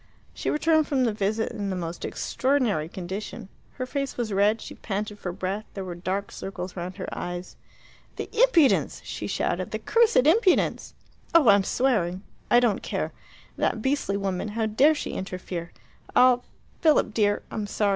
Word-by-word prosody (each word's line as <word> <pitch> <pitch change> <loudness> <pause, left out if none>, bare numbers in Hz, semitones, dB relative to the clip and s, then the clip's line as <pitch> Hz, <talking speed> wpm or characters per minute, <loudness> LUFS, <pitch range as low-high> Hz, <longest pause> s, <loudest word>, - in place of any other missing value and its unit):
She - - -3
returned 315 0 +3
from 270 -3 +1
the 230 -3 +1
visit 210 +2 -1
in 205 -4 -3
the 190 - -2
most 170 -1 -5
extraordinary 250 - 0
condition. 190 +4 -6 0.2
Her 255 - -4
face 275 +1 -3
was 230 -4 -2
red, 205 +3 +3
she - - -8
panted 210 0 -4
for 180 - -4
breath, 195 +4 -3
there 195 - -4
were 180 - -5
dark 185 +3 -3
circles 185 -1 -6
round 180 +1 -5
her - - -5
eyes. 175 +1 -5 0.6
"The - - -4
impudence!" 445 - +4
she - - -5
shouted. - - -1
"The - - -3
cursed 460 - +3
impudence! 370 +4 +3 0.4
Oh, 300 -8 +7
I'm 200 -1 +6
swearing. 190 -7 0 0.3
I 240 - +6
don't 235 -5 +1
care. - - -3 0.5
That 220 - 0
beastly 265 -7 0
woman 195 0 -2
how 225 - +1
dare 265 +9 +4
she - - -4
interfere 180 -2 -5 0.4
I'll 250 -1 +5 0.3
Philip, 310 -2 +3
dear, 205 -2 +2
I'm 210 -1 -3
sorry. 205 0 +1
210 Hz, 165 wpm, -26 LUFS, 190-255 Hz, 0.6 s, Oh